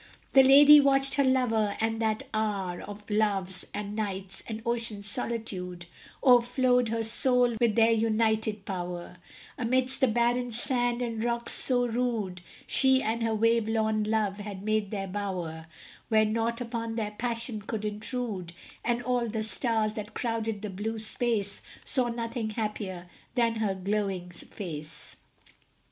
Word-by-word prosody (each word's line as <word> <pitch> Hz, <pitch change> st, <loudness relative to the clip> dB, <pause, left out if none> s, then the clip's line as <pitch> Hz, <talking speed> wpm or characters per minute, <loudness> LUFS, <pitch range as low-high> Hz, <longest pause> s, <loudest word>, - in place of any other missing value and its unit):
The 270 Hz, -, +9 dB
lady 285 Hz, +3 st, +9 dB
watched 275 Hz, -1 st, +3 dB
her 280 Hz, -, +3 dB
lover 235 Hz, -6 st, +1 dB
and 225 Hz, 0 st, -1 dB
that 220 Hz, -1 st, 0 dB
hour 200 Hz, -5 st, -2 dB
Of 205 Hz, 0 st, -10 dB
Love's, 195 Hz, -4 st, 0 dB
and 205 Hz, 0 st, -5 dB
Night's, 195 Hz, -3 st, -3 dB
and 220 Hz, 0 st, -6 dB
Ocean's 230 Hz, -3 st, -2 dB
solitude, 190 Hz, -6 st, -3 dB, 0.4 s
O'erflowed 250 Hz, -1 st, +4 dB
her 230 Hz, 0 st, -1 dB
soul 245 Hz, +1 st, +3 dB
with 230 Hz, -3 st, +3 dB
their 230 Hz, 0 st, +5 dB
united 220 Hz, -2 st, +1 dB
power; 175 Hz, -2 st, -5 dB, 0.4 s
Amidst 255 Hz, +2 st, +1 dB
the 265 Hz, -, +5 dB
barren 240 Hz, +1 st, +1 dB
sand 245 Hz, 0 st, +1 dB
and 230 Hz, -2 st, -3 dB
rocks 235 Hz, 0 st, 0 dB
so 245 Hz, -2 st, +3 dB
rude, 225 Hz, -6 st, -2 dB, 0.2 s
She 265 Hz, -1 st, +4 dB
and 225 Hz, +2 st, -1 dB
her 225 Hz, -1 st, 0 dB
wave 230 Hz, 0 st, +2 dB
worn 220 Hz, -1 st, +1 dB
love 210 Hz, -2 st, 0 dB
had 200 Hz, -2 st, -7 dB
made 215 Hz, -1 st, 0 dB
their 195 Hz, -2 st, -3 dB
bower 180 Hz, -5 st, -4 dB, 0.4 s
Where 215 Hz, -1 st, +4 dB
naught 230 Hz, +2 st, -1 dB
upon 230 Hz, -1 st, -4 dB
their 215 Hz, -2 st, -2 dB
passion 230 Hz, 0 st, -3 dB
could 215 Hz, +1 st, -4 dB
intrude; 210 Hz, -4 st, -3 dB, 0.3 s
And 240 Hz, 0 st, 0 dB
all 245 Hz, -1 st, 0 dB
the 220 Hz, 0 st, -2 dB
stars 220 Hz, -1 st, 0 dB
that 215 Hz, 0 st, -7 dB
crowded 225 Hz, -3 st, -2 dB
the 210 Hz, -, -4 dB
blue 215 Hz, +4 st, -4 dB
space 220 Hz, -2 st, 0 dB, 0.2 s
Saw 255 Hz, -3 st, +1 dB
nothing 230 Hz, -1 st, -3 dB
happier 210 Hz, -5 st, -4 dB, 0.3 s
than 230 Hz, -2 st, +2 dB
her 210 Hz, -3 st, 0 dB
glowing 190 Hz, -2 st, -2 dB
face. 160 Hz, -4 st, -8 dB
220 Hz, 145 wpm, -28 LUFS, 205-235 Hz, 0.4 s, The